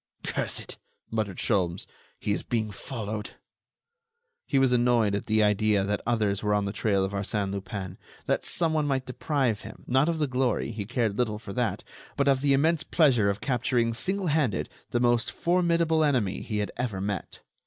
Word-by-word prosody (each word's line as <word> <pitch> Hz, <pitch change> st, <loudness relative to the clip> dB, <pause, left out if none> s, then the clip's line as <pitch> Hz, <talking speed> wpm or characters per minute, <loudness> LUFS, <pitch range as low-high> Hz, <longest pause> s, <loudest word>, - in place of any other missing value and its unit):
"Curse -, -, -2 dB
it!" -, -, -8 dB, 0.3 s
muttered 105 Hz, -4 st, -2 dB
Sholmes; 95 Hz, -5 st, 0 dB, 0.3 s
"he 105 Hz, -, -2 dB
is -, -, 0 dB
being 110 Hz, -3 st, -2 dB
followed." 110 Hz, -1 st, -5 dB, 1.1 s
He 140 Hz, -, +1 dB
was 135 Hz, -1 st, +4 dB
annoyed 120 Hz, -4 st, +3 dB
at 100 Hz, -, -2 dB
the 110 Hz, 0 st, +3 dB
idea 105 Hz, -1 st, +3 dB
that 105 Hz, +1 st, -1 dB
others 105 Hz, -4 st, +1 dB
were 105 Hz, -1 st, +1 dB
on 100 Hz, -1 st, +1 dB
the 100 Hz, -, -3 dB
trail 100 Hz, -4 st, +1 dB
of 95 Hz, -, -4 dB
Arsène 100 Hz, 0 st, -2 dB
Lupin; 95 Hz, -1 st, -5 dB, 0.3 s
that -, -, 0 dB
someone 160 Hz, -3 st, +1 dB
might 135 Hz, -2 st, 0 dB
deprive 130 Hz, -4 st, 0 dB
him, -, -, -11 dB
not 135 Hz, +5 st, +3 dB
of 165 Hz, -, 0 dB
the 155 Hz, -, +1 dB
glory—he 125 Hz, -5 st, -1 dB
cared 115 Hz, -2 st, -1 dB
little 110 Hz, -4 st, +1 dB
for 105 Hz, -2 st, -8 dB
that—but 125 Hz, +4 st, -3 dB
of 135 Hz, -1 st, +3 dB
the 140 Hz, -1 st, +3 dB
immense 160 Hz, +4 st, +3 dB
pleasure 130 Hz, -, +3 dB
of 100 Hz, +1 st, -2 dB
capturing, 120 Hz, -2 st, +1 dB
single 190 Hz, -, -1 dB
handed, 145 Hz, -, +1 dB, 0.2 s
the 120 Hz, -, 0 dB
most 120 Hz, -1 st, +2 dB
formidable 170 Hz, -2 st, +2 dB
enemy 125 Hz, -10 st, +1 dB
he 105 Hz, -, -3 dB
had 105 Hz, -1 st, -1 dB
ever 120 Hz, -6 st, -2 dB
met. 100 Hz, -1 st, -4 dB
115 Hz, 175 wpm, -27 LUFS, 105-135 Hz, 1.1 s, was